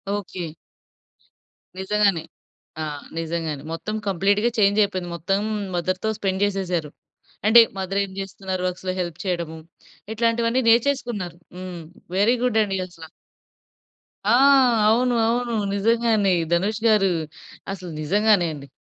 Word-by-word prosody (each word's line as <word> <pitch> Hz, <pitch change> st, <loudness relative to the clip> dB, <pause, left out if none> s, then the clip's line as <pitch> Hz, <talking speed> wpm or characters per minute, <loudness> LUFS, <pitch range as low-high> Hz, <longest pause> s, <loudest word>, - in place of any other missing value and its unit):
Okay. 185 Hz, -4 st, -5 dB, 1.3 s
నిజంగానే. 195 Hz, -3 st, +1 dB, 0.6 s
ఆహ్, 150 Hz, -2 st, -5 dB
నిజంగానే 160 Hz, -3 st, -3 dB
మొత్తం 215 Hz, +6 st, -4 dB
కంప్లీట్‌గా 200 Hz, +4 st, +2 dB
చేంజ్ 205 Hz, 0 st, +4 dB
అయిపోయింది. 185 Hz, -3 st, -3 dB
మొత్తం 195 Hz, +4 st, -1 dB, 0.4 s
మదర్‌తో 185 Hz, +4 st, -1 dB
స్పెండ్ 195 Hz, -1 st, -1 dB
చేసేసారు. 180 Hz, -6 st, -2 dB, 0.6 s
అంటే 230 Hz, +2 st, +8 dB, 0.2 s
మదర్ 190 Hz, +1 st, -2 dB
ఏం 195 Hz, -, -7 dB
చేస్తున్నారు 190 Hz, -1 st, -4 dB
వర్క్స్‌లో 185 Hz, 0 st, -3 dB
హెల్ప్ 175 Hz, -3 st, -3 dB
చేయడము, 170 Hz, -3 st, -2 dB, 0.6 s
ఇట్లాంటివి 230 Hz, +1 st, +1 dB
అన్ని 255 Hz, +3 st, +1 dB
నేర్చేసుకున్నారు. 235 Hz, -8 st, +1 dB, 0.2 s
హ్మ్. 180 Hz, -2 st, -7 dB, 0.4 s
వెరీ 215 Hz, +5 st, +4 dB
గుడ్ 235 Hz, -3 st, +2 dB
అండి 195 Hz, -2 st, -2 dB
అసల. 165 Hz, -3 st, -12 dB, 1.2 s
ఆ! -, -, +1 dB, 0.6 s
అవును. 245 Hz, +2 st, +2 dB
అవును. 240 Hz, 0 st, 0 dB, 0.2 s
నిజంగానే 220 Hz, -2 st, +2 dB, 0.2 s
ధనుష్ 200 Hz, +5 st, 0 dB
గారు, 205 Hz, -3 st, +4 dB, 0.6 s
అసలు 180 Hz, -3 st, -8 dB
నిజంగానే 200 Hz, +3 st, +3 dB
అండి. 140 Hz, -2 st, -10 dB
195 Hz, 115 wpm, -23 LUFS, 175-215 Hz, 1.3 s, అంటే